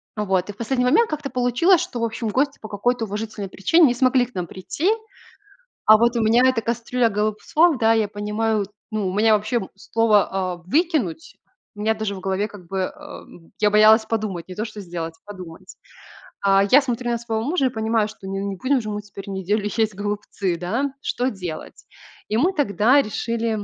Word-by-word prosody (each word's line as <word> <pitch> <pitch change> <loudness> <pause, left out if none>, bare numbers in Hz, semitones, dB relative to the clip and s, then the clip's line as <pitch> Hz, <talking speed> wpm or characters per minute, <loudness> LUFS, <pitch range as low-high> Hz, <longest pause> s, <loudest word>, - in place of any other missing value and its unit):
Вот. 195 -3 0
И - - -5
в - - -28
последний 250 +2 0
момент 455 - +4
как-то 295 -2 -4
получилось, 250 +9 +3
что 240 - -5
в - - -2
общем 225 0 -2
гости 280 +6 0
по 215 - -8
какой-то 225 +3 -1
уважительной 210 -1 -5
причине 325 - +4
не - - +1
смогли 255 0 +3
к 245 - -18
нам 180 -2 -3
прийти. 280 - -2 1.0
А 215 0 +8
вот 235 +2 +2
у 230 - +1
меня 225 +3 +4
эта 235 -3 0
кастрюля 235 +1 0
голубцов, 215 +10 +1
да, 225 0 +4
я 220 -2 +1
понимаю, 210 +1 -1 0.3
ну, 215 -3 -1
у 185 - -3
меня 215 +2 +4
вообще 220 +3 -1
слово, 195 -4 +1
э, - - -18
"выкинуть", 325 - 0 0.4
у 205 - -8
меня 220 +1 +2
даже 215 -2 -3
в - - -7
голове 195 +2 -1
как 200 -5 -13
бы, 195 - -4
э, 185 - 0
м, 165 -1 -13
я 210 - +4
боялась 215 +1 +6
подумать, 210 -7 -3
не 185 - -9
то, 215 - -3
что 215 -2 -8
сделать, 170 -3 -5
подумать. 185 -5 -11 0.7
Э, 195 0 +5
я 280 +3 +7
смотрю 245 -2 -2
на 235 - +1
своего 225 -1 -3
мужа 295 0 +1
и - - +3
понимаю, 220 -2 0
что 210 -2 -12
ну 195 - -4
не 195 - -4
будем 260 +7 +1
же 215 -2 -5
мы 210 0 -4
теперь 200 -1 -11
неделю 195 +2 -1
есть 220 -2 +1
голубцы, 205 -2 -3
да. 235 +11 -2
Что 255 -2 -1
делать? 180 -7 -8 0.4
И 215 - 0
мы 340 +10 +3
тогда 255 - +3
решили, 230 0 -2
220 Hz, 200 wpm, -22 LUFS, 200-245 Hz, 1.0 s, А